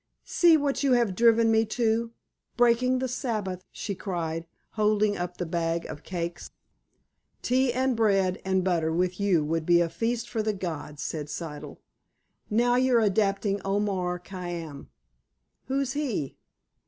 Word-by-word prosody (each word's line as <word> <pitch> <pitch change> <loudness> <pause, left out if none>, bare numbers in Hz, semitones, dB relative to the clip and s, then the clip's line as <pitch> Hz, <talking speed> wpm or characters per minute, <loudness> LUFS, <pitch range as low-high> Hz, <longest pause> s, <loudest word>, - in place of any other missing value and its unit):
"See 340 -2 +5
what 285 -2 -1
you 275 -3 +3
have 235 -5 +2
driven 230 +2 +4
me 220 0 +4
to—breaking 235 +2 0
the 260 +1 -1
Sabbath," 215 -8 -3
she 205 - -4
cried, 170 -4 -4 0.2
holding 210 -1 +2
up 175 -1 -4
the 180 - -2
bag 165 0 -1
of 145 - -7
cakes. 170 -1 -5 0.9
"Tea 255 +1 +2
and 260 +1 +1
bread 195 -4 +2
and 190 -1 +1
butter 170 -3 +1
with 180 +2 0
you 185 -7 +2
would 165 +1 -1
be 170 +1 +4
a 170 -1 +1
feast 230 +5 -2
for 225 - -2
the 215 0 0
gods," 160 -6 -5
said 150 -2 -4
Siddle. 150 -1 -7 0.7
"Now 245 +3 +3
you're 255 -2 +4
adapting 200 -1 +1
Omar 195 -3 -1
Khayyam." 175 -5 -7 0.8
"Who's 270 0 -1
he?" 250 - -2
200 Hz, 140 wpm, -27 LUFS, 175-235 Hz, 0.9 s, See